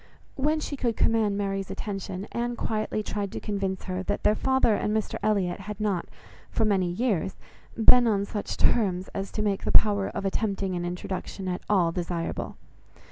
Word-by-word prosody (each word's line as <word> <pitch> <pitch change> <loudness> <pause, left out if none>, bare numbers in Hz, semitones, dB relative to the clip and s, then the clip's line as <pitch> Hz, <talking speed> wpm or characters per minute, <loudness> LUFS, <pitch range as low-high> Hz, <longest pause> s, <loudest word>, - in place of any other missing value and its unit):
When 300 +3 +1
she 300 - -4
could 240 -4 -1
command 215 -3 +2
Mary's 195 -1 -2
attention, 195 -2 -4
Anne 240 0 -1
quietly 215 -1 -1
tried 205 -1 -3
to - - -3
convince 195 -3 -2
her 185 0 -3
that 190 - -2
their 210 - +5
father 265 0 +3
and 210 +1 +1
Mr 215 - -3
Elliot 195 -4 +1
had 210 +1 -7
not, 205 -5 0 0.4
for 225 - +1
many 190 -4 +2
years, 195 -1 0 0.4
been 240 +2 +7
on 200 -2 +2
such 205 0 -4
terms 190 -5 +2
as 195 0 -4
to 215 - -1
make 200 -2 0
the - - 0
power 205 -2 +5
of - - -4
attempting 195 -1 -1
an 175 0 -2
introduction 185 +2 -4
at 180 -1 -2
all 180 -5 +4
desirable. 170 -1 -3
200 Hz, 180 wpm, -27 LUFS, 190-215 Hz, 0.4 s, been